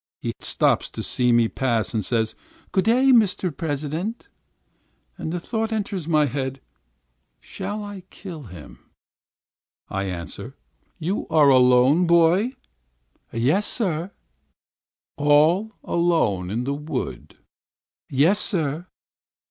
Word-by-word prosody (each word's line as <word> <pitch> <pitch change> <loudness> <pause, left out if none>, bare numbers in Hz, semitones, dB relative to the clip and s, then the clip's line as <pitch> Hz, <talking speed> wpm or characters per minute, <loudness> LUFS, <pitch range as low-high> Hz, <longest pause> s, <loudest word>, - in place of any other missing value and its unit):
He - - -3
stops - - +1
to - - -6
see 125 -1 +1
me 120 -1 +4
pass 120 -3 -1
and 110 -2 0
says, 110 +2 0 0.4
"Good 190 -1 +1
day, 255 +4 +4
Mr. 195 - +3
President." 160 - -4 0.9
And 160 - -5
the 175 - -2
thought 225 +4 -3
enters 200 -6 -3
my 155 -2 +3
head, 135 0 -3 0.8
"Shall 210 0 -6
I 205 -2 -8
kill 175 -6 -9
him?" 85 -5 -12 1.1
I 95 0 -2
answer: 85 -4 -6 0.4
"You 180 +6 -2
are 150 -3 +5
alone, 125 +3 +5
my 180 - +3
boy?" 170 +8 +4 0.8
"Yes, 135 - +1
sir." 180 -6 -1 1.1
"All 155 +9 +3
alone 160 - +1
in 115 +5 -2
the 140 +2 -1
wood?" 140 - -5 0.7
"Yes, 160 +10 +3
sir." 160 -1 -2
155 Hz, 115 wpm, -23 LUFS, 125-190 Hz, 1.1 s, are